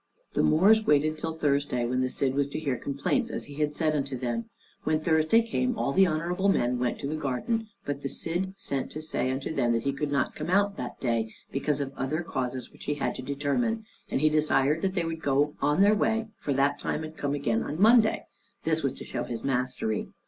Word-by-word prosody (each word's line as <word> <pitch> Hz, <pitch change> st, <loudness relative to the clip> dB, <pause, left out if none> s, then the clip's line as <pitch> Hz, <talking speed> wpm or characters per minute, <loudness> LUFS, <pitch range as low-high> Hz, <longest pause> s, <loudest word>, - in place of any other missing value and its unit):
The -, -, +2 dB
Moors 205 Hz, +8 st, +5 dB
waited 155 Hz, +1 st, +3 dB
till 160 Hz, +1 st, -3 dB
Thursday, 140 Hz, -5 st, +1 dB
when 125 Hz, +2 st, 0 dB
the 130 Hz, -, +1 dB
Cid 130 Hz, 0 st, +1 dB
was 140 Hz, 0 st, +1 dB
to 140 Hz, -, -4 dB
hear 140 Hz, -5 st, -1 dB
complaints, 140 Hz, -, -1 dB
as -, -, -4 dB
he 145 Hz, -, -10 dB
had 150 Hz, 0 st, 0 dB
said 155 Hz, -1 st, +1 dB
unto 140 Hz, -2 st, -2 dB
them. 120 Hz, -2 st, -2 dB, 0.4 s
When 155 Hz, 0 st, +1 dB
Thursday 160 Hz, +8 st, +3 dB
came 240 Hz, +1 st, -1 dB
all 140 Hz, -, 0 dB
the 190 Hz, +6 st, +5 dB
honorable 175 Hz, +4 st, 0 dB
men 125 Hz, -9 st, +2 dB
went 125 Hz, -1 st, 0 dB
to 140 Hz, -, -2 dB
the 155 Hz, -, -2 dB
garden, 155 Hz, -, -1 dB, 0.2 s
but 145 Hz, -1 st, -3 dB
the 140 Hz, -, -3 dB
Cid 185 Hz, +6 st, -2 dB
sent 135 Hz, -7 st, -3 dB
to 155 Hz, -, -5 dB
say 155 Hz, -4 st, -1 dB
unto 135 Hz, +4 st, -2 dB
them 120 Hz, -5 st, +2 dB
that 115 Hz, -1 st, 0 dB
he 140 Hz, -, 0 dB
could 145 Hz, +1 st, -3 dB
not 140 Hz, -2 st, +1 dB
come 155 Hz, +2 st, -5 dB
out 200 Hz, +2 st, +3 dB
that -, -, -6 dB
day, 115 Hz, -3 st, 0 dB, 0.2 s
because 145 Hz, +1 st, 0 dB
of 135 Hz, -1 st, -4 dB
other 150 Hz, +6 st, -2 dB
causes 130 Hz, -5 st, -3 dB
which -, -, -13 dB
he 145 Hz, -, 0 dB
had 145 Hz, -, -1 dB
to -, -, -6 dB
determine; 150 Hz, -, -1 dB, 0.2 s
and -, -, 0 dB
he 155 Hz, -, +5 dB
desired 155 Hz, 0 st, +2 dB
that 190 Hz, 0 st, -1 dB
they 175 Hz, -3 st, +1 dB
would 165 Hz, -1 st, -4 dB
go 145 Hz, +2 st, +2 dB, 0.2 s
their 200 Hz, +2 st, +6 dB
way 225 Hz, +1 st, +1 dB
for 145 Hz, -, -4 dB
that 140 Hz, +1 st, +2 dB
time, 155 Hz, -, -2 dB
and 155 Hz, 0 st, -7 dB
come 145 Hz, -1 st, -1 dB
again 115 Hz, -6 st, 0 dB
on 145 Hz, -, -4 dB
the 170 Hz, -, -4 dB
Monday: 225 Hz, 0 st, +5 dB, 0.4 s
this 160 Hz, 0 st, +1 dB
was 135 Hz, -3 st, 0 dB
to -, -, -9 dB
show -, -, -3 dB
his 115 Hz, -2 st, -5 dB
mastery. 125 Hz, -4 st, -1 dB
145 Hz, 230 wpm, -28 LUFS, 135-165 Hz, 0.4 s, their